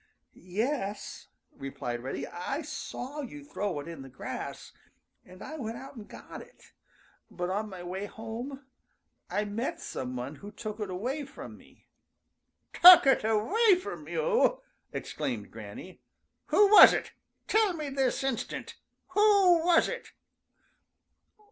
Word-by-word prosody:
"Yes," 205 - -4 0.2
replied 135 -3 -5
Reddy, 135 +2 -4
"I 270 - -4
saw 290 0 -6
you 290 +2 -9
throw 205 - -3
it 145 - -11
in 165 -4 -8
the 135 - -10
grass, 125 - -7 0.5
and 185 +1 -13
I 310 - -7
went 230 -4 -5
out 270 +2 -10
and 215 -3 -10
got - - -10
it, 485 +1 -18 0.6
but 175 0 -4
on 210 +3 -2
my 185 -3 -9
way 190 +3 -5
home 235 +6 -7 0.6
I 210 - -1
met 215 +5 -3
some 130 -1 -5
one 130 +4 -5
who 205 +6 -10
took 215 0 -7
it 210 -2 -3
away 250 +11 -3
from 275 - -10
me." - - -21 0.9
"Took 355 -2 +11
it 270 -4 +4
away 365 - +3
from 365 - -7
you!" - - +1 0.3
exclaimed - - -4
Granny. - - -10 0.5
"Who 410 -1 +5
was 425 - +10
it? - - -3 0.4
Tell 430 -3 +3
me 305 -4 -4
this 270 -1 0
instant! 270 -3 -4 0.3
Who 390 -4 +5
was 345 -1 +4
it?" - - -7
240 Hz, 140 wpm, -29 LUFS, 190-315 Hz, 0.9 s, Took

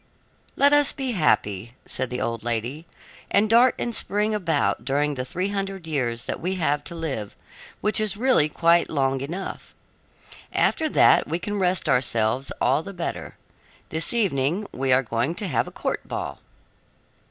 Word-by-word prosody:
"Let 285 +1 +4
us 290 -1 +4
be 265 -2 -3
happy," 115 - 0
said 130 - -2
the 125 - -4
old 115 -1 -2
lady, 120 +7 -3 0.4
"and 205 +2 +3
dart 235 +3 +5
and 240 - -3
spring 210 0 0
about 165 - 0
during 145 +3 0
the 130 -2 -3
three 180 +9 -3
hundred 195 -3 -3
years 125 -7 -2
that - - -3
we 185 +3 -1
have 150 -5 0
to 170 - -7
live, 135 -11 -4 0.5
which 210 +1 +3
is 215 -2 0
really 240 - +3
quite 170 +2 +3
long 135 -2 0
enough. 175 +8 -6 0.8
After 315 -1 +1
that - - +5
we 165 - -1
can 205 +3 -4
rest 180 -2 +1
ourselves 125 -1 +1
all 135 +4 +2
the 200 - -8
better. 170 - -5 0.5
This 160 +1 -1
evening 185 - +1
we 135 0 -1
are 130 +1 +5
going 120 +7 -1
to 205 - -3
have 125 -9 0
a - - -8
court - - -3
ball." - - -5
160 Hz, 165 wpm, -24 LUFS, 130-200 Hz, 0.8 s, dart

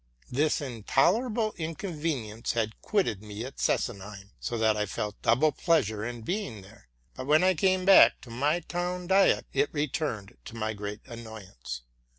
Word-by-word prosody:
'Chis 150 +4 +2
intolerable 195 - +1
inconvenience 155 - -3
had 110 -2 -2
quitted 185 - 0
me 105 +2 -6
at 135 - -10
Sesenheim, 100 -3 -2
so 120 - -3
that 110 -1 +3
I 105 0 -1
felt 105 +1 -4
double 135 +7 +4
pleasure 110 - +1
in 120 0 -5
being 135 - -3
there; 100 - -18 0.2
but 130 - -7
when 155 +4 +5
I 185 0 +5
came 185 +2 +2
back 195 0 +8
to 120 - -12
my 145 +8 +1
town 180 +1 -3
diet 190 +2 +4
it - - +1
returned, 145 - -3
to - - -9
my 110 -1 -2
great 105 0 -6
annoyance. 95 - -8
120 Hz, 160 wpm, -28 LUFS, 105-165 Hz, 0.2 s, back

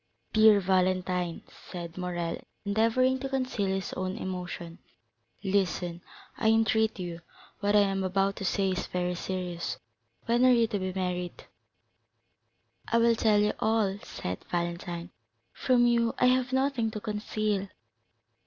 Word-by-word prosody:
"Dear 220 -1 +7
Valentine," 185 -2 0 0.3
said 170 -2 -6
Morrel, 175 -2 -3 0.3
endeavoring 230 +5 +2
to 270 +1 -4
conceal 255 -7 -1
his 190 0 -2
own 185 0 -3
emotion, 175 -2 -5 0.6
"listen, 180 -3 0 0.4
I 220 - +1
entreat 220 0 +3
you; 175 -2 -5 0.4
what 205 +1 +1
I 205 - +7
am 195 -1 +1
about 195 +1 +1
to 200 - -5
say 195 0 +1
is 185 - -2
very 180 0 -1
serious. 180 -1 -4 0.5
When 240 +2 +2
are 255 - +7
you 235 -1 +4
to 215 -3 -2
be 185 0 -2
married?" 180 -1 -3 1.4
"I 230 - +2
will 230 0 +4
tell 220 -2 +3
you 210 - +2
all," 215 -3 +1
said 90 0 -6
Valentine; 175 0 -3 0.4
"from 245 -2 +3
you 235 -1 +2
I - - +3
have 255 0 +3
nothing 260 -3 +1
to 220 -1 -5
conceal. 210 -2 -2
195 Hz, 140 wpm, -29 LUFS, 180-225 Hz, 1.4 s, Dear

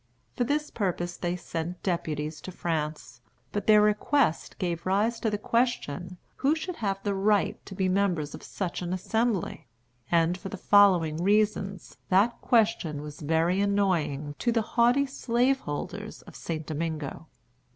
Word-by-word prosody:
For 245 - +1
this 300 +4 -1
purpose 175 -4 -2
they 175 0 -2
sent 175 0 -5
deputies 155 -4 -2
to 185 - -7
France. 155 -7 -3 0.3
But 205 - -3
their 210 -1 +7
request 210 - +1
gave 175 -1 -2
rise 215 +5 +1
to 225 - 0
the 210 - -1
question 185 - -1 0.2
who 280 +4 +2
should 340 +2 -5
have 195 -3 -2
the 205 - 0
right 205 +1 +1
to 195 - -8
be 190 -1 +1
members 180 -6 0
of - - -8
such 185 -3 -4
an 175 0 -3
Assembly; 200 - -1 0.4
and, 170 +1 +3
for 195 - -6
the 200 - -6
following 180 -6 +5
reasons, 195 -1 0
that 200 +6 +3
question 210 - +2
was 150 -1 -9
very 165 +5 +2
annoying 175 -8 0
to 240 - +1
the 225 -1 +1
haughty 245 +4 +4
slaveholders 235 - -2
of - - -14
St. 160 -2 -4
Domingo. 160 0 -4
190 Hz, 150 wpm, -28 LUFS, 165-215 Hz, 0.4 s, their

